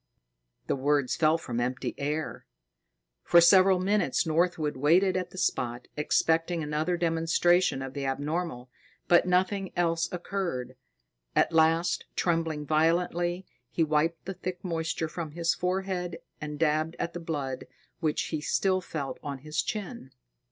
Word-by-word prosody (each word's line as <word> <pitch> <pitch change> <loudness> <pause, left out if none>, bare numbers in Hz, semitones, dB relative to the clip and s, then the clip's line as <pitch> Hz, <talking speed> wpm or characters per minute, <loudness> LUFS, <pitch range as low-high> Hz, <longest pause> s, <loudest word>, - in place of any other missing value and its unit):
The - - 0
words 140 -1 +1
fell 155 0 +3
from 120 -7 -4
empty 125 +1 -2
air. 150 +2 -3 0.8
For 175 - +6
several 185 +2 +6
minutes, 200 +1 +1
Northwood 160 -2 +1
waited 175 +8 +3
at 185 -1 -2
the - - -13
spot, 120 -8 -1
expecting 165 +2 +1
another 155 +4 -1
demonstration 165 -2 +2
of 135 0 -6
the 140 -1 -4
abnormal, 145 -2 -3 0.4
but 175 +1 +5
nothing 190 +1 +1
else 165 -1 +1
occurred. 170 -9 -3 0.6
At - - +3
last, 165 +1 +3
trembling 165 -3 0
violently, 175 +3 +1 0.2
he 165 - +1
wiped 160 +2 0
the 195 - -4
thick 185 0 -6
moisture 160 -2 -2
from 160 -2 -6
his 170 0 +1
forehead 180 -2 -2 0.2
and 150 -1 -5
dabbed 155 +1 +1
at 170 - -3
the 175 - -5
blood 145 -6 -4 0.3
which 155 -3 0
he 155 -2 -2
still 185 +4 +1
felt 150 -6 -5
on 140 -2 -5
his 155 +3 -2
chin. 215 - -5
165 Hz, 140 wpm, -28 LUFS, 150-180 Hz, 0.8 s, For